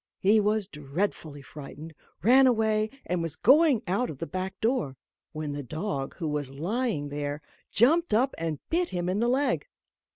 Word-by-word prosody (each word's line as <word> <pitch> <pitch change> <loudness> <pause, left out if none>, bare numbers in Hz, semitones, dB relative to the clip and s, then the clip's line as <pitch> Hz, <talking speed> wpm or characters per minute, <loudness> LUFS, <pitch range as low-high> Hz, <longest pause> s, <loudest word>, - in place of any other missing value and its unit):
He 210 +3 +4
was 210 -1 +1
dreadfully 150 -1 -4
frightened, 150 +3 -10 0.3
ran 260 +5 +7
away, 220 -2 +2 0.2
and 180 -1 -1
was 165 -2 -3
going 275 -2 +5
out 200 +7 0
of 145 - -7
the 165 - -4
back 185 +2 -5
door; 225 - 0 0.3
when 155 -1 -4
the 145 0 -4
dog, 150 - -4
who 165 - -4
was 150 -2 -2
lying 170 - -2
there, 145 0 -3 0.3
jumped 320 +10 +3
up 250 +6 +3
and 165 -2 -3
bit 345 +1 +1
him 175 -1 -2
in 185 +3 0
the 235 +1 +2
leg. 270 +3 +1
190 Hz, 170 wpm, -27 LUFS, 150-235 Hz, 0.3 s, ran